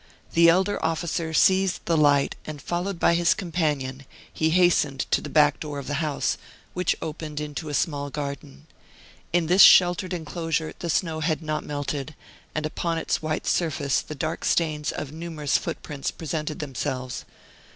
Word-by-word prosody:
The 170 0 +6
elder 190 +4 +2
officer 165 0 -1
seized 190 +3 +3
the 170 - +2
light, 145 -2 +3
and 155 -1 -7
followed 175 +5 -3
by - - +4
his 170 0 +3
companion, 150 -8 -2 0.3
he 160 - +1
hastened 160 -5 +3
to - - +3
the - - -7
back 150 -2 +4
door 150 -2 -5
of 140 - -6
the 145 +2 -2
house, 150 -3 -1 0.3
which 180 -1 +1
opened 155 -1 -5
into 150 +1 -5
a 145 - -2
small 145 -4 -1
garden. 140 0 -6 0.7
In 175 -1 +2
this 180 +4 +5
sheltered 180 0 +7
enclosure 165 -2 -2
the 170 - -4
snow 160 -1 0
had 160 0 -1
not 155 0 -2
melted, 145 0 -4 0.4
and 155 0 -1
upon 165 +2 -2
its 160 0 -1
white 155 0 -2
surface 155 -5 +1
the 155 - -8
dark 155 +3 -3
stains 155 -3 +1
of 145 - -5
numerous 160 -2 -3
footprints 145 -3 -4
presented 155 -1 -4
themselves. 130 -3 -4
155 Hz, 160 wpm, -25 LUFS, 145-170 Hz, 0.7 s, sheltered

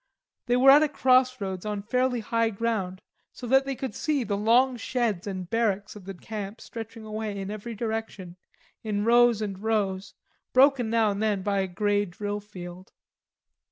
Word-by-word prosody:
They 245 0 +3
were 265 +2 +7
at 290 +2 +7
a 310 - +2
cross 255 -2 +3
roads 190 -3 -4
on 210 -1 -4
fairly 250 +2 0
high 230 +1 0
ground 200 -4 -3 0.3
so 250 - -9
that 265 +3 +3
they 275 - -2
could 260 -3 -5
see 300 -5 -1
the 205 -2 -2
long 240 +5 +3
sheds 230 -6 -2
and 185 -3 -5
barracks 210 -2 -1
of 205 -3 -12
the 195 0 -7
camp 210 +2 -7
stretching 225 -1 -9
away 215 -1 -4
in 195 0 -5
every 215 +2 -6
direction, 220 -5 -5 0.5
in 210 -1 -2
rows 235 -2 +4
and 195 -3 -5
rows, 200 -3 -1 0.4
broken 260 -3 +4
now 225 -2 +2
and 200 +1 -4
then 210 -3 0
by 200 0 0
a 190 - 0
grey 205 +3 0
drill 205 +3 -4
field. 185 -3 -10
215 Hz, 180 wpm, -26 LUFS, 200-240 Hz, 0.5 s, were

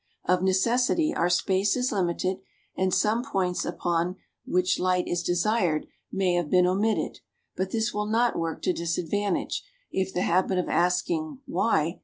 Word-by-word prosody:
Of 180 0 +2
necessity 245 - +2
our 175 - +1
space 190 +2 +2
is 250 +1 0
limited 185 -1 0 0.4
and 190 0 +1
some 220 +6 +2
points 190 -9 -1
up - - -7
on 175 +1 +1 0.3
which 180 +1 +1
light 180 0 +1
is 175 0 -1
desired 175 -2 +1 0.3
may 190 -2 +1
have 175 -3 0
been 180 -1 +4
omitted, 200 +5 0 0.4
but 190 0 -2
this 225 +1 -1
will 210 0 -2
not 235 +3 +2
work 165 -1 -3
to 185 - +2
disadvantage 175 +4 -1 0.3
if 190 0 -1
the 180 - -1
habit 185 +2 +2
of 180 - 0
asking"why?" 225 - 0
185 Hz, 155 wpm, -26 LUFS, 175-215 Hz, 0.4 s, been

